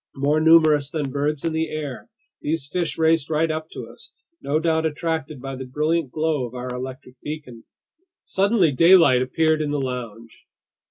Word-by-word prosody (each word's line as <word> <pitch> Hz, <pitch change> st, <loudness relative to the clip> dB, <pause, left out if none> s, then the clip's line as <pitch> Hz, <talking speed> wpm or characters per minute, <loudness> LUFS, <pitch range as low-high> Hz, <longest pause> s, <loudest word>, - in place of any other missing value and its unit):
More 145 Hz, +3 st, +1 dB
numerous 155 Hz, -3 st, +5 dB
than 145 Hz, -3 st, -3 dB
birds 145 Hz, +2 st, -2 dB
in 165 Hz, -, -1 dB
the 160 Hz, 0 st, -1 dB
air, 150 Hz, -4 st, -6 dB, 0.3 s
these 155 Hz, -2 st, -2 dB
fish 175 Hz, +2 st, -2 dB
raced 160 Hz, -2 st, +2 dB
right 160 Hz, +1 st, +1 dB
up 155 Hz, 0 st, -5 dB
to -, -, -7 dB
us, -, -, -16 dB, 0.3 s
no 145 Hz, +2 st, 0 dB
doubt 160 Hz, -1 st, +1 dB
attracted 160 Hz, -2 st, -3 dB
by 135 Hz, +1 st, -6 dB
the 130 Hz, 0 st, -7 dB
brilliant 150 Hz, +3 st, 0 dB
glow 155 Hz, -2 st, -1 dB
of 120 Hz, -, -13 dB
our 125 Hz, 0 st, -5 dB
electric 130 Hz, 0 st, -8 dB
beacon. 145 Hz, -7 st, -8 dB, 0.6 s
Suddenly 195 Hz, -4 st, +2 dB
daylight 165 Hz, -3 st, +6 dB
appeared 155 Hz, +4 st, +1 dB
in 150 Hz, -, -2 dB
the 145 Hz, 0 st, -1 dB
lounge. 120 Hz, -4 st, -6 dB
150 Hz, 170 wpm, -22 LUFS, 130-160 Hz, 0.6 s, daylight